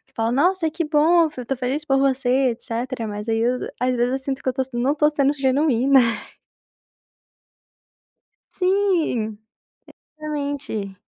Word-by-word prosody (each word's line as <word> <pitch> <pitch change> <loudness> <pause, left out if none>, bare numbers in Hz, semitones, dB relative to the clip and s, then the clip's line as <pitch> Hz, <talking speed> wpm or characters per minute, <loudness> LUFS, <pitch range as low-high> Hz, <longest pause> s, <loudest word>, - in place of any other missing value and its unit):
falo: 225 +1 0
"Nossa, 335 +5 +2
que 335 +2 -2
bom, 315 +3 +4
eu 320 - +2 0.2
estou 270 +2 -3
feliz 265 +4 -2
por 270 -2 +2
você, 265 -1 +2
etc", 235 +1 -4
mas, 210 +1 -6
aí, 225 0 +1
eu 245 +2 +1 0.2
às 255 0 +1
vezes, 245 +1 +1
eu 265 - 0
sinto 270 0 -4
que 260 - 0
eu - - +1
estou 265 +1 -1
s 260 - -15
não 240 +3 +1
estou 300 0 +3
sendo 285 -1 +1
genuína. 270 -1 +3 2.5
Sim, 365 - 0 0.8
exatamente. 285 -9 -4
270 Hz, 145 wpm, -22 LUFS, 245-300 Hz, 2.5 s, bom